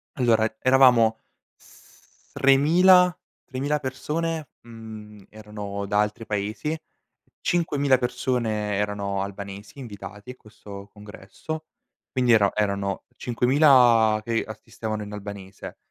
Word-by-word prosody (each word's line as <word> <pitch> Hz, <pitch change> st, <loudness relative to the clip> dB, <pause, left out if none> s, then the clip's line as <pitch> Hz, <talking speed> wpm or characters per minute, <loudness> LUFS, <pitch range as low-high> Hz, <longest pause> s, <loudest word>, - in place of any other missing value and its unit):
Allora, 115 Hz, -4 st, +2 dB
eravamo 125 Hz, -4 st, +5 dB, 0.4 s
s -, -, -24 dB
3.000- 175 Hz, +7 st, +5 dB, 0.3 s
3.000 145 Hz, +3 st, -2 dB
persone, 155 Hz, +4 st, -3 dB
mhmm, 110 Hz, -3 st, -11 dB
erano 105 Hz, -2 st, -7 dB
da 105 Hz, +1 st, 0 dB
altri 105 Hz, +2 st, -3 dB
paesi, 105 Hz, +10 st, -3 dB, 0.6 s
5.000 145 Hz, -6 st, +1 dB
persone 115 Hz, -4 st, -1 dB
erano 100 Hz, -1 st, -2 dB
albanesi 100 Hz, +5 st, -8 dB
invitati 105 Hz, -1 st, -9 dB
a -, -, -12 dB
questo 100 Hz, -3 st, -12 dB
congresso; 105 Hz, +10 st, -9 dB, 0.5 s
quindi 125 Hz, -3 st, +2 dB
ero 100 Hz, -3 st, +4 dB
erano 100 Hz, -1 st, -1 dB
5.000 125 Hz, -4 st, +4 dB
che 115 Hz, 0 st, -1 dB
assistevano 110 Hz, 0 st, -6 dB
in 105 Hz, 0 st, -9 dB
albanese, 100 Hz, -2 st, -9 dB
110 Hz, 100 wpm, -24 LUFS, 105-130 Hz, 0.6 s, eravamo